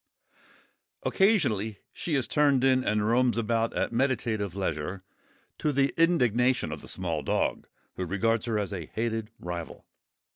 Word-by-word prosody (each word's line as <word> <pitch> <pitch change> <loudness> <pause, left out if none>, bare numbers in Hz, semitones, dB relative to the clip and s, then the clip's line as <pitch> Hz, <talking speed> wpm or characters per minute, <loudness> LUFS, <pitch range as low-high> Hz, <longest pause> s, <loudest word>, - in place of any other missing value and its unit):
Occasionally 125 - +2 0.2
she 160 - -2
is 130 -3 +1
turned 140 -4 +3
in 130 -1 +4
and 105 -2 +1
roams 120 +1 +3
about 115 0 +1
at - - -1
meditative 115 -6 0
leisure, 90 0 -3 0.6
to 150 - +1
the 140 0 +2
indignation 125 - +3
of 75 - -6
the - - -12
small 85 -5 -2
dog, - - -1 0.3
who 95 - -2
regards 115 +5 0
her 110 -2 0
as 100 -1 -2
a 85 -6 -5
hated 110 -1 -2
rival. 85 -1 -6
115 Hz, 145 wpm, -28 LUFS, 100-130 Hz, 0.6 s, in